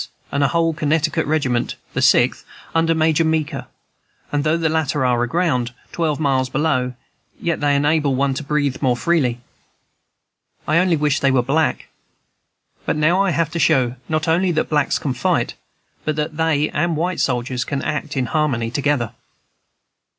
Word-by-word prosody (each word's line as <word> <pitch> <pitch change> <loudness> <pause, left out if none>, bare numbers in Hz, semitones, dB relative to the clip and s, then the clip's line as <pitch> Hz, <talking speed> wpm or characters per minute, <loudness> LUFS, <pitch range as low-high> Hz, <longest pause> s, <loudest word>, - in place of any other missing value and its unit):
and 140 0 +1
a - - +4
whole 165 +2 +1
Connecticut 155 -1 0
regiment, 135 -6 0 0.2
the - - -1
Sixth, - - +3 0.3
under 165 0 +2
Major 160 0 +2
Meeker; 160 -2 -1 0.6
and 145 -1 0
though 155 +2 +2
the 165 -1 0
latter 150 -3 0
are 120 -1 +2
aground, 125 -3 0 0.2
twelve 155 -3 -1
miles 135 -3 +1
below, 130 -4 0 0.4
yet 170 -1 -1
they 145 -1 +2
enable 145 -1 +2
one 135 +1 +1
to 130 - -4
breathe 145 -2 -1
more 125 -3 +2
freely. 125 -4 +1 1.3
I 155 +2 +3
only 180 -1 +3
wish 150 -1 +1
they 135 - +2
were 130 -2 +2
black; 150 +5 0 0.9
but - - -1
now 160 +5 +3
I 195 - +2
have 165 -2 0
to 170 - -3
show, 130 -7 +2
not 155 0 -1
only 175 +3 +2
that 155 - -1
blacks 150 +3 +1
can 140 -7 -2
fight, 125 - 0 0.5
but 155 - -1
that 150 +1 -3
they 155 -2 +1
and 170 -2 0
white 175 +3 -1
soldiers 125 0 -1
can 140 +1 -3
act 150 -1 -3
in 130 - +1
harmony 125 -6 0
together." 140 -4 0
150 Hz, 165 wpm, -20 LUFS, 135-160 Hz, 1.3 s, a